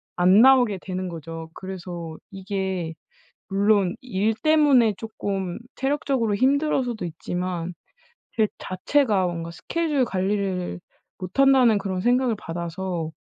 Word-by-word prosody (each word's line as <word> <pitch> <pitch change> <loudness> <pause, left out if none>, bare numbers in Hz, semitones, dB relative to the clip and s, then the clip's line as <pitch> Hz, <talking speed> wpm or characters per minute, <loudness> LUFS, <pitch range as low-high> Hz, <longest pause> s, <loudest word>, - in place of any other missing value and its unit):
안 185 +4 +5
나오게 250 -6 +5
되는 185 -1 -4
거죠. 165 0 -7
그래서 175 -3 -7 0.2
이게 190 -3 -3 0.6
물론 200 -2 +2
일 220 -3 0
때문에 285 -8 +5
쪼끔 195 -4 -4 0.2
체력적으로 270 -5 0
힘들어서도 260 -3 +1
있지만 175 +1 -4 0.6
제 220 -2 +3
자체가 205 0 +1
뭔가 170 -1 -4
스케줄 295 - -1
관리를 190 -2 -2 0.4
못 185 +8 -7
한다는 260 -5 +6
그런 190 -2 -3
생각을 245 0 +2
받아서 170 -1 -4
195 Hz, 265 characters per minute, -24 LUFS, 180-245 Hz, 0.6 s, 한다는